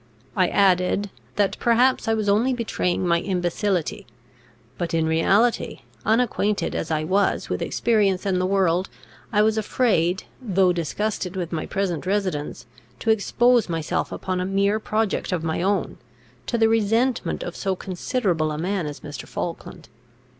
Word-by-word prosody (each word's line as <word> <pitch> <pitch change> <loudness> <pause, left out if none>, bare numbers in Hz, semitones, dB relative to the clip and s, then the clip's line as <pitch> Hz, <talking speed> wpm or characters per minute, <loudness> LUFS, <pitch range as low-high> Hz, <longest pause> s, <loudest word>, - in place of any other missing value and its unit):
I 185 -2 +3
added, 195 +1 +2 0.2
that 205 -2 +1
perhaps 245 +2 +3
I 225 - +3
was 215 -2 -2
only 220 +6 +3
betraying 185 -6 -1
my 170 0 +3
imbecility; 180 - -1 0.7
but 170 +1 -2
in 160 -1 +2
reality, 195 +9 +2 0.2
unacquainted 215 -2 +1
as 160 - -3
I 155 -1 0
was 190 +5 +1
with - - -2
experience 205 -5 +1
and 185 -2 +1
the 185 - +1
world, 190 -1 +1 0.4
I 210 -1 +4
was 220 0 +2
afraid, 195 -6 +1 0.2
though 190 -6 +2
disgusted 185 +3 -2
with 175 -3 -3
my 160 -2 -3
present 185 -4 -2
residence, 185 -10 -2 0.3
to 225 - +1
expose 235 +1 +3
myself 165 -2 -2
upon 185 -1 -3
a - - 0
mere 200 +2 +1
project 215 -2 -1
of 175 -3 -1
my 160 0 -1
own, 195 0 -1 0.5
to - - 0
the 225 -1 +4
resentment 225 +3 +1
of 175 - -6
so 195 -1 -1
considerable 180 - -1
a 150 - -4
man 180 0 -1
as 145 - -7
Mr. 145 -1 -8
Falkland. 170 -1 -6
195 Hz, 155 wpm, -23 LUFS, 175-215 Hz, 0.7 s, I